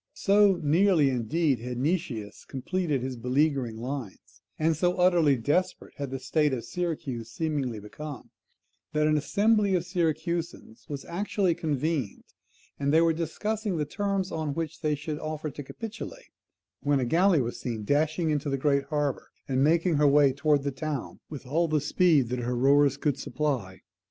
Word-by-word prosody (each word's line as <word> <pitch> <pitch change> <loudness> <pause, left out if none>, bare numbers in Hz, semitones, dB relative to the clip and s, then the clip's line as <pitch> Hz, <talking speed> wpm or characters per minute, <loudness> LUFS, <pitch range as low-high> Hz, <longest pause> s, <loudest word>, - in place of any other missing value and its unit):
So 200 -1 +4
nearly, 160 -2 +4
indeed, 130 +3 0
had 125 +1 -5
Nicias 130 - -2
completed 150 0 -2
his 130 0 -3
beleaguering 130 -1 0
lines, 125 -4 -7 0.2
and 160 +1 +2
so 180 +3 +1
utterly 175 -5 +4
desperate 150 +10 -1
had 140 -2 -4
the 135 - -4
state 150 +2 +1
of 120 -3 -3
Syracuse 140 -8 -4
seemingly 135 -4 -2
become, 140 +7 -9 0.6
that 150 0 +2
an 155 0 +3
assembly 205 +6 +2
of 175 - +1
the 180 - -14
Syracusans 165 - -2
was 140 -2 -5
actually 190 0 0
convened, 150 -7 -2 0.6
and 140 0 +1
they 160 +2 +5
were 165 -1 +4
discussing 200 +5 -2
the 150 - 0
terms 195 +3 -2
on 155 -3 -3
which 165 -2 -4
they 150 -1 +1
should 150 +1 -5
offer 155 -1 -4
to 145 - -7
capitulate, 225 - -8 0.5
when 145 -1 +2
a 130 - 0
galley 175 +5 +4
was 120 -2 -3
seen 115 -4 -4
dashing 155 - +1
into 150 -1 -1
the 135 - 0
great 140 0 +1
harbour, 145 -2 -2 0.2
and 130 0 +1
making 165 +1 +3
her 150 0 +4
way 140 -1 +5
towards 145 0 +2
the 140 - -1
town 140 0 -5
with 145 -3 -8
all 165 +6 +1
the 155 -1 +1
speed 150 -3 +3
that 125 0 -2
her 125 +1 -2
rowers 140 +2 +4
could 145 -2 -1
supply. 130 - -2
150 Hz, 170 wpm, -27 LUFS, 135-170 Hz, 0.6 s, they